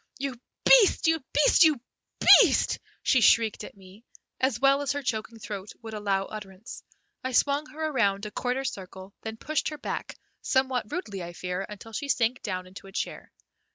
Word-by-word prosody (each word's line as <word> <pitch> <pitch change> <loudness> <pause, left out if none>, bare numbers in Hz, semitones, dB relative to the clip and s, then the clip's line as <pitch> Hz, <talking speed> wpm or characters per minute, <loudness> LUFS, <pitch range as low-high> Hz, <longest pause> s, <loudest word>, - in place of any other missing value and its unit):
"You 275 0 -3 0.3
beast, 470 -8 +6
you 320 -3 +2
beast, 295 - +4
you 310 -5 +4 0.6
beast!" - - +2 0.2
she 255 - +3
shrieked 220 -1 +4
at 210 - -11
me, 190 +3 -16 0.4
as 260 -2 0
well 275 +1 +4
as 285 -1 -1
her 285 0 -4
choking 225 -1 -3
throat 205 -2 -7
would 220 -1 -8
allow 200 -2 -1
utterance. 205 0 -9 0.4
I 260 0 -3
swung 285 +4 +2
her 315 +1 -5
around 210 -9 0
a 210 - -6
quarter 250 +4 -2
circle, 190 -5 -7
then 220 0 -6
pushed 310 +6 -2
her 305 - -7
back, - - -5 0.2
somewhat 260 -4 0
rudely 205 - -4
I 175 0 -7
fear, 180 +2 -4
until 210 +2 -10
she 285 +6 -4
sank 245 -1 +1
down 185 -3 -4
into 190 +1 -12
a - - -12
chair. - - -5
225 Hz, 180 wpm, -27 LUFS, 195-275 Hz, 0.6 s, beast